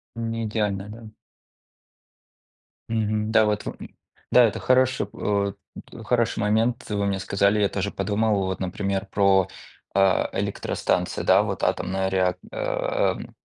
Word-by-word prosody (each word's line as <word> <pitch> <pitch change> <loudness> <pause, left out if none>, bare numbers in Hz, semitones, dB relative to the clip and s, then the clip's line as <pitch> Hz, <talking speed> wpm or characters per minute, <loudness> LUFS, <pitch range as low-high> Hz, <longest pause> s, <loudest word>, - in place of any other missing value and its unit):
Неидеальная, 110 -3 -2
да. 110 0 -10 1.8
Мгм. 110 -1 -1
Да, 110 -1 +5
вот 105 -1 -1
в - - -5 0.5
да, 125 - +7
это 110 - 0
хороший 130 -4 +2
от 100 -1 -1 0.5
хороший 120 -2 +1
момент, 115 +4 +1
вы 100 -1 -1
мне 100 -1 0
сказали, 100 +2 +1
я 100 - +3
тоже 100 0 -2
подумал, 105 0 0
вот, 95 - -3
например, 95 +1 -2
про, 95 -2 +3 0.5
а, 95 -1 +3
электростанции, - - -1
да. - - +5
Вот - - -4
атомная 95 +1 0
реак 95 -1 +1
ам. - - -1
105 Hz, 125 wpm, -24 LUFS, 100-115 Hz, 1.8 s, да